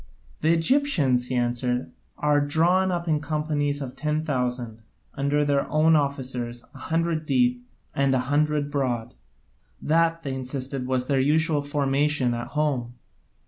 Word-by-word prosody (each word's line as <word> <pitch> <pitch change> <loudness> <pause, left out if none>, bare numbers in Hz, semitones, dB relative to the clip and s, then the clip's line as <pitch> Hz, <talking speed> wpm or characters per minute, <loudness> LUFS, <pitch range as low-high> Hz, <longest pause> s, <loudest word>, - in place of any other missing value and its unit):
'" - - -30
"The 160 - +3
Egyptians," 165 - +2
he 130 - -3
answered, 125 +1 -1 0.3
"are 150 -1 +2
drawn 175 +6 +2
up 170 -1 -3
in 155 -2 +2
companies 145 -1 -1
of 130 -1 -8
ten 155 0 -1
thousand, 125 -5 -2 0.3
under 145 +1 0
their 140 -1 0
own 155 +1 +4
officers, 130 -4 -2
a - - -12
hundred 165 0 -1
deep, 125 -2 +2 0.3
and 140 -1 +1
a 125 0 0
hundred 150 0 +1
broad: 125 -4 -2 0.7
that, 165 +1 +1
they 135 -3 -3
insisted, 130 0 -4
was 130 -1 0
their 135 0 +1
usual 150 +2 +2
formation 145 -2 +1
at 120 0 -4
home. 130 -6 -1
140 Hz, 145 wpm, -25 LUFS, 125-155 Hz, 0.7 s, own